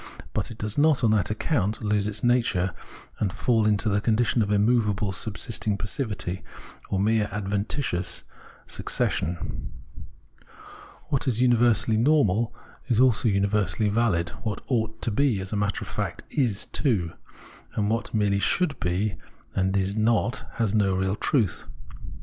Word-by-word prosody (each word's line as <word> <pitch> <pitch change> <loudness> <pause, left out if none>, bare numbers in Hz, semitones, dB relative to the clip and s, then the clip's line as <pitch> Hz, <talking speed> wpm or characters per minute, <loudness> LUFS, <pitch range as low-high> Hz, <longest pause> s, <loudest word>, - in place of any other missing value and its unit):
But - - -2
it 115 - -9
does 105 +3 -2
not, 150 -3 +4
on 110 - +4
that 105 -4 +2
account, 110 - -1
lose 105 -1 +1
its 105 0 -2
nature 115 -7 +2 0.5
and 100 -3 0
fall 110 +2 +2
into 105 +1 +1
the 100 -1 +2
condition 115 +1 +2
of 105 - 0
immovable 105 -1 +2
subsisting 105 +1 -2
passivity, 105 -5 -4 0.5
or 95 - 0
mere 105 +1 +2
adventitious 100 0 -2 0.4
{gleichgiiltig) - - -5
succession. 85 +2 -1 1.4
What 140 0 0
is 120 -3 +1
universally 120 -3 +3
normal 115 -4 +3 0.4
is 120 -4 +2
also 125 -2 +4
univer 100 -1 +1
sally 110 -2 0
valid: 100 -6 +1
what 105 -3 -3
ought 110 -3 -1
to 115 - +1
be, 125 -2 +2
as 95 +2 -5
a - - 0
matter 100 -1 -1
of - - -9
fact - - -4
is 120 -8 0
too; 100 - 0 0.6
and 105 -1 +1
what 115 +1 -1
merely 105 -2 +1
should 155 - +1
be, 95 +3 -1 0.4
and 95 +1 +1
is 95 +1 0
not, 115 +2 +1
has 110 -4 0
no 100 -3 +2
real 95 +1 0
truth. 110 - 0
105 Hz, 150 wpm, -26 LUFS, 100-115 Hz, 1.4 s, not